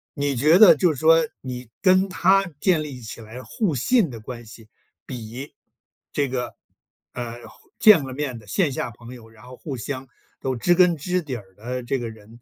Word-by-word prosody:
你 145 -2 -1
觉 150 +7 +5
得 190 -5 +9
就 170 +3 +2
是 135 - -8
说 165 0 +5
你 125 -2 -7
跟 185 +1 +4
他 195 +2 +3
建 180 -5 +2
立 140 -4 -8
起 115 0 -9
来 110 +3 -10
互 155 - -2
信 185 - +2
的 115 - -8
关 120 +2 -8
系， 110 0 -14 0.4
比 125 +2 -8 0.6
这 145 - 0
个， 125 -1 -4 0.6
呃， 120 -1 -7
后 - - -20
见 210 -9 +7
了 130 -1 -6
面 130 -3 -4
的 105 - -18
线 160 - +1
下 125 - -3
朋 120 +2 -12
友， 115 -3 -13
然 110 -1 -19
后 125 0 -11
互 140 -5 -6
相 130 +3 -5 0.3
都 130 -1 -2
知 175 +9 +2
根 175 -2 +4
知 180 +4 -1
底 140 -5 -5
儿 95 -4 -11
的 125 +5 -5
这 130 +2 -1
个 115 -1 -4
人， 110 +2 -15
130 Hz, 220 characters per minute, -23 LUFS, 120-165 Hz, 0.6 s, 得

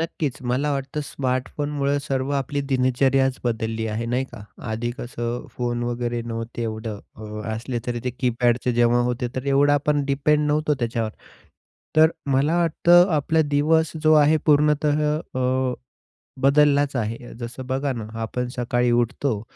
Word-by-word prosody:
नक्कीच, 155 -4 -2
मला 130 +4 0
वाटतं 135 +2 -3
स्मार्टफोनमुळं 140 +2 -1
सर्व 135 -1 -2
आपली 140 +1 -2
दिनचर्याच 130 +1 +2
बदलली 115 -1 -1
आहे, 110 +2 -3
नाही 125 +3 0
का? 115 -4 -9 0.3
आधी 115 +2 -2
कसं 120 0 -4
फोन 120 -1 -1
वगैरे 120 0 -2
नव्हते 115 0 -5
एवढं. 110 -1 -4 0.2
अ, 110 - -10 0.3
असले 120 +3 -3
तरी 120 -1 -2
ते 125 - 0
कीपॅडचे 120 0 +1
जेव्हा 120 0 +3
होते, 125 0 -1
तर 130 - -3
एवढं 140 +1 +4
आपण 145 0 +1
डिपेंड 150 +2 +2
नव्हतो 150 0 +1
त्याच्यावर. 115 -2 -1 0.9
तर 160 +1 +7 0.2
मला 145 +5 +2
वाटतं 175 +2 +5
आपला 160 +2 +2
दिवस 155 +2 +2
जो 155 - +6
आहे 150 +1 +5
पूर्णतः 150 0 +3 0.2
अ, 130 -3 -1 0.7
बदललाच 145 0 +4
आहे. 115 -1 -2 0.2
जसं 120 +2 -6
बघा 135 +2 -1
ना, 115 -4 -5 0.2
आपण 125 +2 -3
सकाळी 120 0 +1
उठतो, 120 -1 0
130 Hz, 145 wpm, -23 LUFS, 120-145 Hz, 0.9 s, तर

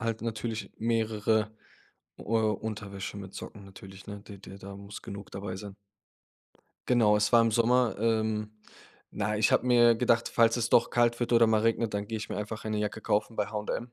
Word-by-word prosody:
halt 115 -2 -2
natürlich 110 0 -4
mehrere, 110 -1 +1 0.7
äh, - - -9
Unterwäsche 105 -3 -2
mit 95 -1 -8
Socken 100 -1 -9
natürlich, 95 0 -13
ne? 100 -1 -7
D 100 -1 -12
d 95 +1 -11
da 100 +1 -9
muss 100 +1 -9
genug 100 0 -9
dabei 95 -1 -5
sein. 100 0 -9 1.1
Genau, 115 -4 +4
es 105 0 +1
war 120 - +7
im 115 -1 +1
Sommer. 120 +2 +3
Ähm, 110 -1 0 0.6
na, 105 +1 -1
ich 110 - +3
habe - - +3
mir 120 -1 +6
gedacht, 115 0 +2
falls 115 0 +3
es 115 -1 0
doch 115 - +4
kalt 120 0 +2
wird 120 - -1
oder 115 -1 +6
mal 110 -1 +3
regnet, 115 -1 0
dann 100 0 -2
gehe 110 - -3
ich 110 - -6
mir - - -4
einfach 105 +1 -5
eine 110 -1 -2
Jacke 105 +1 -3
kaufen 110 +1 -1
bei 105 - 0
H&M 105 +3 -4
110 Hz, 195 wpm, -29 LUFS, 105-115 Hz, 1.1 s, war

